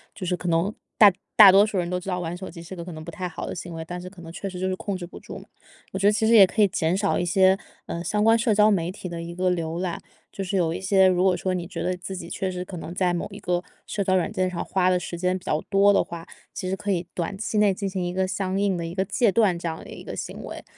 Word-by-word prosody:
就 190 Hz, -, -6 dB
是 180 Hz, 0 st, 0 dB
可 180 Hz, -, -6 dB
能 170 Hz, +5 st, +1 dB, 0.2 s
大 205 Hz, -3 st, +8 dB, 0.2 s
大 205 Hz, -3 st, +10 dB
多 195 Hz, +2 st, +7 dB
数 215 Hz, -2 st, -1 dB
人 175 Hz, -1 st, 0 dB
都 180 Hz, -, 0 dB
知 180 Hz, -, -7 dB
道 180 Hz, -1 st, -1 dB
玩 170 Hz, -1 st, -4 dB
手 190 Hz, +1 st, -7 dB
机 170 Hz, 0 st, -10 dB
是 180 Hz, +3 st, -8 dB
个 170 Hz, -, -6 dB
可 180 Hz, -, -8 dB
能 155 Hz, 0 st, -9 dB
不 170 Hz, -, -7 dB
太 180 Hz, +2 st, -4 dB
好 165 Hz, -, -6 dB
的 -, -, -5 dB
行 175 Hz, -1 st, -7 dB
为， 160 Hz, 0 st, -6 dB
但 175 Hz, +2 st, -6 dB
是 180 Hz, -, -8 dB
可 185 Hz, -1 st, -17 dB
能 165 Hz, -, -9 dB
确 195 Hz, +3 st, -5 dB
实 180 Hz, -1 st, -7 dB
就 185 Hz, -, -1 dB
是 185 Hz, -, -1 dB
控 195 Hz, 0 st, -4 dB
制 180 Hz, -, -6 dB
不 175 Hz, -, -11 dB
住 -, -, -9 dB
嘛。 -, -, -12 dB, 0.5 s
我 190 Hz, -, -4 dB
觉 200 Hz, -, +3 dB
得 -, -, +6 dB
其 215 Hz, +1 st, +1 dB
实 225 Hz, -, +4 dB
也 200 Hz, -4 st, +9 dB
可 220 Hz, -, -6 dB
以 -, -, +6 dB
减 175 Hz, -1 st, 0 dB
少 200 Hz, 0 st, +1 dB
一 175 Hz, -, 0 dB
些， 190 Hz, +2 st, +4 dB, 0.3 s
嗯， 170 Hz, -, -5 dB
相 210 Hz, +3 st, 0 dB
关 225 Hz, +1 st, +6 dB
社 225 Hz, -2 st, +2 dB
交 210 Hz, +1 st, +5 dB
媒 175 Hz, -3 st, 0 dB
体 190 Hz, -1 st, -8 dB
的 170 Hz, -1 st, -5 dB
一 170 Hz, 0 st, -7 dB
个 180 Hz, 0 st, +1 dB
浏 165 Hz, -1 st, -2 dB
览， 180 Hz, -2 st, -3 dB, 0.3 s
就 -, -, -6 dB
是 195 Hz, +1 st, -3 dB
有 170 Hz, -3 st, +1 dB
一 -, -, -4 dB
些 190 Hz, 0 st, +4 dB
如 180 Hz, -1 st, +2 dB
果 185 Hz, -1 st, +4 dB
说 185 Hz, +1 st, -2 dB
你 175 Hz, -2 st, -3 dB
觉 165 Hz, -2 st, -5 dB
得 180 Hz, 0 st, -1 dB
自 190 Hz, +2 st, -6 dB
己 170 Hz, -2 st, -7 dB
确 190 Hz, -, -2 dB
实 180 Hz, -1 st, -4 dB
可 180 Hz, 0 st, -8 dB
能 170 Hz, 0 st, -7 dB
在 180 Hz, -2 st, +1 dB
某 170 Hz, -, -2 dB
一 -, -, -9 dB
个 175 Hz, 0 st, -1 dB, 0.2 s
社 200 Hz, -2 st, -3 dB
交 185 Hz, -, +2 dB
软 185 Hz, +2 st, +1 dB
件 185 Hz, -3 st, 0 dB
上 180 Hz, -2 st, -4 dB
花 185 Hz, -1 st, +1 dB
的 180 Hz, -, +3 dB
时 175 Hz, -1 st, -5 dB
间 180 Hz, +1 st, 0 dB
比 180 Hz, -, -14 dB
较 150 Hz, -, 0 dB
多 200 Hz, +1 st, +5 dB
的 -, -, +4 dB
话， 170 Hz, -1 st, -7 dB, 0.3 s
其 185 Hz, -, -4 dB
实 190 Hz, -, 0 dB
可 205 Hz, -, -5 dB
以 175 Hz, -1 st, -2 dB
短 180 Hz, +3 st, -3 dB
期 215 Hz, +1 st, -3 dB
内 210 Hz, -2 st, +4 dB
进 195 Hz, +1 st, -3 dB
行 190 Hz, -1 st, -3 dB
一 175 Hz, -, -3 dB
个 190 Hz, +1 st, +1 dB
相 190 Hz, 0 st, -2 dB
应 200 Hz, -2 st, +1 dB
的 170 Hz, -, -3 dB
一 165 Hz, +1 st, -6 dB
个 190 Hz, -, +1 dB
戒 230 Hz, +4 st, +2 dB
断， 195 Hz, -4 st, +2 dB
这 170 Hz, -, -4 dB
样 160 Hz, -1 st, -3 dB
的 -, -, -12 dB
一 -, -, -9 dB
个 -, -, -6 dB
行 -, -, -6 dB
为， -, -, -8 dB
185 Hz, 350 characters per minute, -24 LUFS, 175-195 Hz, 0.5 s, 大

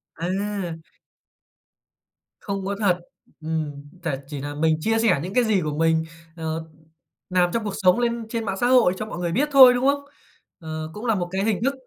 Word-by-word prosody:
À! 185 Hz, -1 st, -3 dB, 1.6 s
Không 195 Hz, -2 st, -4 dB
có 200 Hz, +1 st, -2 dB
thật. 190 Hz, -5 st, +2 dB, 0.4 s
Ừm, 160 Hz, -1 st, -2 dB, 0.3 s
tà 155 Hz, -6 st, -1 dB
chỉ 145 Hz, -1 st, -6 dB
nà 145 Hz, +1 st, -5 dB
mình 160 Hz, +1 st, +2 dB
chia 225 Hz, +7 st, +1 dB
sẻ 220 Hz, -9 st, +3 dB
những 185 Hz, +3 st, -5 dB
cái 250 Hz, -, +3 dB
gì 215 Hz, -4 st, +2 dB
của 150 Hz, -2 st, -3 dB
mình, 160 Hz, 0 st, +2 dB, 0.3 s
ờ, 160 Hz, -1 st, -4 dB, 0.6 s
làm 180 Hz, -1 st, +3 dB
trong 230 Hz, -, 0 dB
cuộc 205 Hz, -2 st, -3 dB
sống 185 Hz, +4 st, +4 dB
lên 235 Hz, -1 st, -1 dB
trên 230 Hz, -1 st, -3 dB
mạng 195 Hz, -1 st, -2 dB
xã 240 Hz, -, +3 dB
hội 245 Hz, -8 st, +5 dB
cho 215 Hz, -, -4 dB
mọi 195 Hz, -, -7 dB
người 175 Hz, -1 st, -1 dB
biết 275 Hz, -, +1 dB
thôi, 260 Hz, -3 st, +9 dB
đúng 250 Hz, +1 st, 0 dB
không? 280 Hz, +1 st, +2 dB, 0.5 s
Ờ, 155 Hz, -2 st, -5 dB
cũng 210 Hz, +3 st, -7 dB
là 225 Hz, -2 st, +2 dB
một 175 Hz, -3 st, -2 dB
cái 190 Hz, +1 st, -1 dB
hình 215 Hz, -2 st, +1 dB
thức 275 Hz, +2 st, +2 dB
190 Hz, 200 wpm, -23 LUFS, 160-225 Hz, 1.6 s, thôi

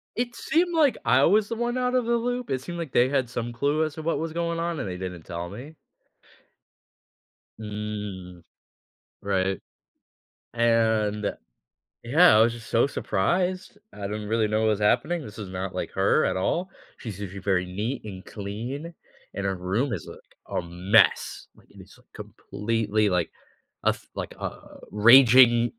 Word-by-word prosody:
It 240 Hz, 0 st, -2 dB
seemed 345 Hz, +2 st, 0 dB
like 300 Hz, -5 st, +4 dB
I 130 Hz, +4 st, +4 dB
was 205 Hz, +5 st, +3 dB
the 230 Hz, -, -2 dB
one 240 Hz, +1 st, -2 dB
outta 250 Hz, 0 st, +1 dB
the 235 Hz, +1 st, +1 dB
loop. 245 Hz, +1 st, -3 dB
It 130 Hz, -1 st, -1 dB
seemed 175 Hz, +6 st, -7 dB
like 165 Hz, -5 st, -5 dB
they 125 Hz, +2 st, +3 dB
had 135 Hz, -3 st, 0 dB
some 120 Hz, -1 st, -4 dB
clue 145 Hz, +6 st, 0 dB
as 155 Hz, -1 st, -3 dB
to 160 Hz, -, -7 dB
what 165 Hz, -, 0 dB
was 165 Hz, +1 st, -3 dB
going 170 Hz, 0 st, -2 dB
on, 170 Hz, -2 st, -2 dB
and -, -, -3 dB
they 90 Hz, -1 st, -5 dB
didn't 90 Hz, -2 st, -6 dB
tell 85 Hz, +1 st, -6 dB
me. 130 Hz, -, -10 dB, 1.8 s
Mm. 105 Hz, -4 st, -6 dB, 0.8 s
Right, 95 Hz, -2 st, -1 dB, 0.9 s
and 110 Hz, -3 st, +1 dB, 0.7 s
yeah, 155 Hz, +5 st, +6 dB
I -, -, +6 dB
was 115 Hz, +1 st, +3 dB
just 115 Hz, -1 st, -11 dB
so 115 Hz, -, +3 dB
surprised. 180 Hz, -, -1 dB, 0.2 s
I -, -, -11 dB
didn't 105 Hz, +1 st, -4 dB
really 110 Hz, 0 st, +1 dB
know 110 Hz, +1 st, 0 dB
what 110 Hz, -, +2 dB
was 105 Hz, -2 st, +1 dB
happening. 165 Hz, +11 st, +1 dB
This 105 Hz, -4 st, -10 dB
is 100 Hz, -3 st, -6 dB
not 95 Hz, 0 st, -5 dB
like -, -, -4 dB
her -, -, +3 dB
at -, -, 0 dB
all. 175 Hz, -, -1 dB, 0.3 s
She's 105 Hz, -5 st, -7 dB
usually 100 Hz, -1 st, -6 dB
very 95 Hz, -2 st, +1 dB
neat 105 Hz, +9 st, -4 dB
and 95 Hz, -3 st, -8 dB
clean, 120 Hz, +11 st, -6 dB, 0.4 s
and 100 Hz, -, -4 dB
her 95 Hz, -1 st, 0 dB
room 100 Hz, +9 st, -1 dB
is 85 Hz, -, -5 dB
a -, -, -9 dB, 0.4 s
a -, -, -2 dB
mess, 90 Hz, +3 st, +2 dB
like, -, -, -23 dB
it -, -, -14 dB
is -, -, -17 dB
completely, 110 Hz, -1 st, -2 dB
like, 90 Hz, -3 st, 0 dB, 0.6 s
a -, -, +6 dB
f -, -, -4 dB
like, -, -, -5 dB
a -, -, -8 dB
raging 120 Hz, +1 st, +7 dB
115 Hz, 170 wpm, -25 LUFS, 100-160 Hz, 1.8 s, raging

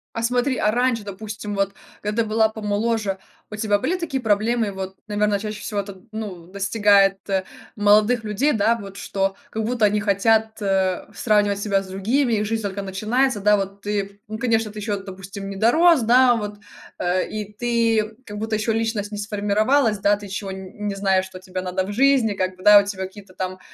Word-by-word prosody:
А 230 Hz, -, -2 dB
смотри, 250 Hz, +3 st, +1 dB
а 210 Hz, -, +2 dB
раньше, 245 Hz, -2 st, +1 dB
допустим, 205 Hz, +1 st, -6 dB
вот 195 Hz, 0 st, 0 dB, 0.3 s
когда 210 Hz, +2 st, 0 dB
ты -, -, -6 dB
была 220 Hz, 0 st, +3 dB
помоложе, 215 Hz, -1 st, -1 dB, 0.3 s
у 210 Hz, -, -6 dB
тебя 210 Hz, -1 st, +1 dB
были 360 Hz, -, 0 dB
такие 300 Hz, -7 st, -3 dB
проблемы? 220 Hz, 0 st, +1 dB
Вот, 190 Hz, 0 st, -6 dB
наверно, 210 Hz, -1 st, +1 dB
чаще 215 Hz, 0 st, -5 dB
всего 205 Hz, -2 st, -2 dB
это, 195 Hz, -1 st, -11 dB
ну, 195 Hz, -6 st, -6 dB
достигает, 200 Hz, 0 st, +3 dB, 0.6 s
молодых 210 Hz, +3 st, +4 dB
людей, 220 Hz, +8 st, +1 dB
да, 225 Hz, +2 st, +2 dB
вот, 195 Hz, -1 st, -9 dB
что 195 Hz, -1 st, -1 dB
как 220 Hz, -, -3 dB
будто 230 Hz, -1 st, +1 dB
они 210 Hz, 0 st, +2 dB
хотят, 220 Hz, +2 st, +1 dB
э, 190 Hz, -2 st, 0 dB
сравнивать 205 Hz, -3 st, +2 dB
себя 200 Hz, -1 st, +1 dB
с -, -, -12 dB
другими, 225 Hz, +7 st, 0 dB
их 210 Hz, -1 st, +1 dB
жизнь 225 Hz, +1 st, -1 dB
только 200 Hz, -1 st, -3 dB
начинается, 215 Hz, +6 st, 0 dB
да, 210 Hz, +1 st, +4 dB
вот 195 Hz, 0 st, -4 dB
ты, 200 Hz, -1 st, -3 dB
ну, 215 Hz, -, -5 dB
конечно, 225 Hz, -2 st, 0 dB
ты 210 Hz, -, -8 dB
ещё, 205 Hz, -1 st, -2 dB
допустим, 195 Hz, +1 st, -8 dB
не 195 Hz, -, -6 dB
дорос, 315 Hz, -, +5 dB
да, 245 Hz, +2 st, +5 dB
вот, 210 Hz, -2 st, -5 dB, 0.4 s
э, 180 Hz, +1 st, 0 dB
и 210 Hz, -1 st, -5 dB
ты 225 Hz, -1 st, +1 dB
как 210 Hz, -1 st, -8 dB
будто 220 Hz, +1 st, -2 dB
еще 215 Hz, +2 st, 0 dB
личность 220 Hz, -2 st, -1 dB
не 210 Hz, -, -5 dB
сформировалась, 210 Hz, +3 st, +1 dB
да, 205 Hz, +1 st, +3 dB
ты 205 Hz, 0 st, -9 dB
чего 195 Hz, 0 st, -5 dB
н 190 Hz, +2 st, -7 dB
не 200 Hz, -, -2 dB
знаешь, 190 Hz, -1 st, +1 dB
что 190 Hz, -1 st, -10 dB
тебе 185 Hz, 0 st, -5 dB
надо 185 Hz, +1 st, -2 dB
в 205 Hz, -, -5 dB
жизни, 255 Hz, -2 st, +3 dB
как 185 Hz, -1 st, -2 dB
бы, 185 Hz, -, -14 dB
да, 210 Hz, 0 st, +9 dB
у 200 Hz, -, 0 dB
тебя 200 Hz, -2 st, -4 dB
какие-то 190 Hz, 0 st, -13 dB
там 185 Hz, 0 st, -4 dB
210 Hz, 200 wpm, -22 LUFS, 195-225 Hz, 0.6 s, да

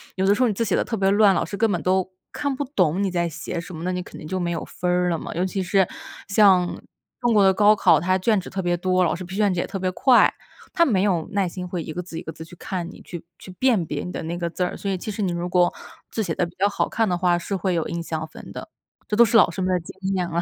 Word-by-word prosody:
有 190 Hz, -, 0 dB
的 200 Hz, -, +5 dB
时 230 Hz, -, -1 dB
候， 250 Hz, -, +5 dB
你 220 Hz, -, 0 dB
字 230 Hz, -, 0 dB
写 195 Hz, -, +1 dB
得 -, -, +1 dB
特 225 Hz, -, -3 dB
别 195 Hz, -1 st, +2 dB
乱， 205 Hz, -1 st, +5 dB
老 -, -, 0 dB
师 200 Hz, -, -6 dB
根 220 Hz, 0 st, +2 dB
本 175 Hz, -, 0 dB
都 185 Hz, 0 st, +1 dB, 0.2 s
看 285 Hz, -2 st, -2 dB
不 285 Hz, -, -3 dB
懂 180 Hz, +1 st, +2 dB
你 195 Hz, -, 0 dB
在 170 Hz, -1 st, 0 dB
写 170 Hz, +2 st, -5 dB
什 170 Hz, +1 st, -9 dB
么， 160 Hz, -, -7 dB
那 185 Hz, -, -1 dB
你 180 Hz, 0 st, -2 dB
肯 -, -, -11 dB
定 155 Hz, -, -9 dB
就 185 Hz, +3 st, -2 dB
没 175 Hz, -1 st, -1 dB
有 170 Hz, -2 st, -3 dB
分 180 Hz, -, -4 dB
儿 180 Hz, 0 st, +2 dB
了 165 Hz, -, -1 dB
嘛。 -, -, -7 dB
尤 175 Hz, +2 st, 0 dB
其 190 Hz, +1 st, -2 dB
是 190 Hz, 0 st, +2 dB, 0.4 s
像 190 Hz, -3 st, +4 dB, 0.4 s
中 240 Hz, -1 st, +2 dB
国 205 Hz, -, +6 dB
的 190 Hz, 0 st, +5 dB
高 210 Hz, +2 st, +5 dB
考， 170 Hz, -6 st, +4 dB
他 185 Hz, +4 st, +1 dB
卷 200 Hz, +1 st, +1 dB
子 -, -, -9 dB
特 195 Hz, -, -5 dB
别 175 Hz, -2 st, +1 dB
多， 185 Hz, +1 st, +1 dB
老 170 Hz, -, +1 dB
师 175 Hz, -, -5 dB
批 190 Hz, +1 st, -8 dB
卷 205 Hz, -2 st, +2 dB
子 180 Hz, -, -2 dB
也 -, -, -1 dB
特 -, -, -5 dB
别 185 Hz, -1 st, -1 dB
快。 250 Hz, +7 st, +4 dB, 0.4 s
他 340 Hz, -2 st, +4 dB
没 200 Hz, -, +2 dB
有 180 Hz, -6 st, +1 dB
耐 195 Hz, -2 st, +1 dB
心 180 Hz, +1 st, -6 dB
会 175 Hz, -2 st, -4 dB
一 160 Hz, -, -7 dB
个 180 Hz, -, -3 dB
字 170 Hz, -2 st, -9 dB
一 -, -, -6 dB
个 160 Hz, -, -6 dB
字 160 Hz, -, -10 dB
去 165 Hz, +2 st, -13 dB
看 175 Hz, -1 st, -5 dB
你， -, -, -13 dB
去 175 Hz, -2 st, -8 dB
去 185 Hz, -, -11 dB
辨 235 Hz, -9 st, +3 dB
别 150 Hz, -1 st, -4 dB
你 180 Hz, -, -6 dB
的 -, -, -5 dB
那 165 Hz, +2 st, -4 dB
个 175 Hz, -1 st, -2 dB
字 180 Hz, -, -2 dB
儿。 180 Hz, -, -2 dB
所 200 Hz, -, -4 dB
以 190 Hz, -, 0 dB
其 215 Hz, -, -5 dB
实 210 Hz, +1 st, -5 dB
你 190 Hz, -3 st, 0 dB
如 175 Hz, +1 st, -3 dB
果 180 Hz, 0 st, +3 dB, 0.4 s
字 220 Hz, -, -2 dB
写 170 Hz, -5 st, -2 dB
得 -, -, 0 dB
比 175 Hz, -, -16 dB
较 200 Hz, -, +3 dB
好 205 Hz, -, -1 dB
看 225 Hz, -1 st, +1 dB
的 180 Hz, -, +1 dB
话， 175 Hz, 0 st, +2 dB
是 185 Hz, +3 st, -3 dB
会 185 Hz, -1 st, -1 dB
有 165 Hz, -, -1 dB
印 170 Hz, -, -4 dB
象 160 Hz, -1 st, -4 dB
分 -, -, -12 dB
的。 -, -, -8 dB, 0.4 s
这 210 Hz, -, -1 dB
都 235 Hz, -, +7 dB
是 230 Hz, 0 st, +4 dB
老 185 Hz, -, +5 dB
师 190 Hz, -, -5 dB
们 185 Hz, -, 0 dB
的 180 Hz, -, +2 dB
经 165 Hz, -, -11 dB, 0.2 s
验 180 Hz, -2 st, -1 dB
了。 170 Hz, 0 st, -1 dB
185 Hz, 345 characters per minute, -23 LUFS, 175-200 Hz, 0.4 s, 都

